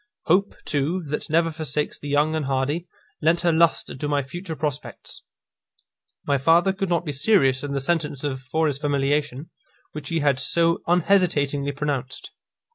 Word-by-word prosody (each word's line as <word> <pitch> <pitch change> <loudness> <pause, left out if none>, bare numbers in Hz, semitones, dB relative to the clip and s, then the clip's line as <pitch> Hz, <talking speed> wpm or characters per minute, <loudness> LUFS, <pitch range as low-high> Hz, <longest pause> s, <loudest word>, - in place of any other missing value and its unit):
Hope, 195 +5 +2
too, 155 +5 -1
that 150 +3 -4
never 165 +1 +2
forsakes 150 -2 -3
the 145 - -7
young 145 +2 +2
and 155 -2 -1
hardy, 140 +6 -1 0.3
lent 165 +2 +2
her 170 -2 +2
lustre 165 -2 +2
to 145 +3 -4
my 145 -1 0
future 170 +4 -7
prospects. 150 -2 -5 1.0
My 140 -1 +1
father 170 +7 +4
could 195 -1 -3
not 170 -1 0
be 150 - -2
serious 135 -3 +3
in 145 -1 -4
the 140 - -1
sentence 150 -2 -1
of 135 -3 -3
foris 145 +1 -1
familiation, 145 0 -1 0.4
which 150 -2 -7
he 165 -1 0
had 140 -3 +2
so 165 +5 +2
unhesitatingly 160 -6 +2
pronounced. 135 -3 -4
150 Hz, 160 wpm, -23 LUFS, 140-165 Hz, 1.0 s, father